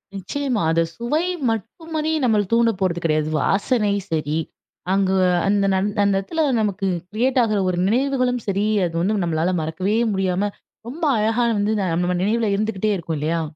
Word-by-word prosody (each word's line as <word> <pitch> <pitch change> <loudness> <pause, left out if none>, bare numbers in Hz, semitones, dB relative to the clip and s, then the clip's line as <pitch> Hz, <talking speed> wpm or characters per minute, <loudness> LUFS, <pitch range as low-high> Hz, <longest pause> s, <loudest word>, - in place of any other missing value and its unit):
நிச்சயமா. 245 +4 -2
அத 165 +1 +2
சுவை 295 +9 -1 0.2
மட்டுமாரி 315 - -3
நம்மள 220 -4 +3
தூண்ட 230 0 +4
போறது 175 -2 0
கெடையாது. 155 -1 +1
வாசனை 210 +1 +1 0.2
சரி, 155 -1 -1 0.6
அங்கே 190 -1 +2 0.3
அந்த 200 0 +2
நந் 190 +2 +1
அந்த 200 0 +2
இடத்துல 320 - -2 0.2
நமக்கு 200 -2 -1 0.2
கிரியேட் 250 +4 +1
ஆகிற 215 -3 +1
ஒரு 180 - -1
நினைவுகளும் 250 0 +1
சரி, 200 +1 0 0.2
அது 165 -1 -4
வந்து 200 +3 +1
நம்மளால 170 +2 0
மறக்கவே 185 +7 -1 0.2
முடியாம, 190 +1 0 0.4
ரொம்ப 310 +7 -8 0.2
அழகா 225 +3 +1 0.2
வந்து 205 +2 +1
நம்ம 180 0 0
நினைவில 215 0 +1
இருந்துகிட்டே 215 0 -1
இருக்கும் 165 -2 -4
இல்லயா! 165 +3 0
205 Hz, 150 wpm, -21 LUFS, 180-235 Hz, 0.6 s, தூண்ட